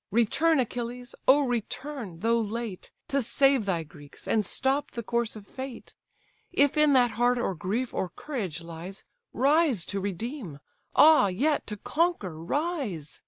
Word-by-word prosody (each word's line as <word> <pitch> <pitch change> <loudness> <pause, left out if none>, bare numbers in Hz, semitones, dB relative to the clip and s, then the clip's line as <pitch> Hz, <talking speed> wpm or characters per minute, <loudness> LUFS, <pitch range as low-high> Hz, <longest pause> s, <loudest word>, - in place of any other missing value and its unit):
Return, 270 - +3
Achilles: 245 +1 -3
oh 280 +3 +7
return, 245 - -4
though 230 +1 +3
late, 220 -2 -5 0.2
To 275 0 +1
save 270 0 +3
thy 170 -4 0
Greeks, 145 -2 -13
and 215 - +2
stop 265 +8 0
the 235 - -6
course 235 0 -1
of 210 -2 -10
Fate; 260 +2 -8 0.6
If 285 -1 +3
in 300 -1 +5
that 245 -3 +4
heart 245 +1 +2
or 235 -5 -1
grief 210 +9 -2
or 185 - -2
courage 190 - -5
lies, 170 +3 -9 0.3
Rise 275 - +3
to 200 - -3
redeem; 200 - -5 0.4
ah, 310 -9 +7
yet 280 +12 0
to 210 - -5
conquer, 250 - 0
rise! 260 - -2
235 Hz, 150 wpm, -27 LUFS, 195-275 Hz, 0.6 s, oh